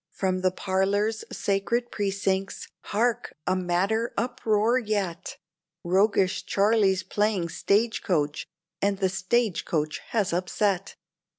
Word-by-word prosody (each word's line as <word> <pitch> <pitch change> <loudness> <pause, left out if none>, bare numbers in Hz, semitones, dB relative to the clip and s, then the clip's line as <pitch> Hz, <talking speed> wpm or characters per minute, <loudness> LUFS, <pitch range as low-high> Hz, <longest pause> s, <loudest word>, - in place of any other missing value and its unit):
From 185 0 -1
from - - -5
the 185 - +3
parlor's 200 +4 0
sacred 220 +5 -1
precincts, 195 -1 -1 0.2
hark! 235 +3 0
a - - +1
madder 190 +6 0
uproar 235 -1 +1
yet; 200 -7 -3 0.5
Roguish 190 +1 +2
Charlie's 200 -2 +2
playing 200 -2 0
stage 220 +7 +1
coach, 150 -5 -1 0.3
and 200 0 +1
the 190 -1 +1
stage 190 +2 0
coach 155 -1 -1
has 210 -6 0
upset! 185 +2 0
195 Hz, 115 wpm, -26 LUFS, 185-215 Hz, 0.5 s, the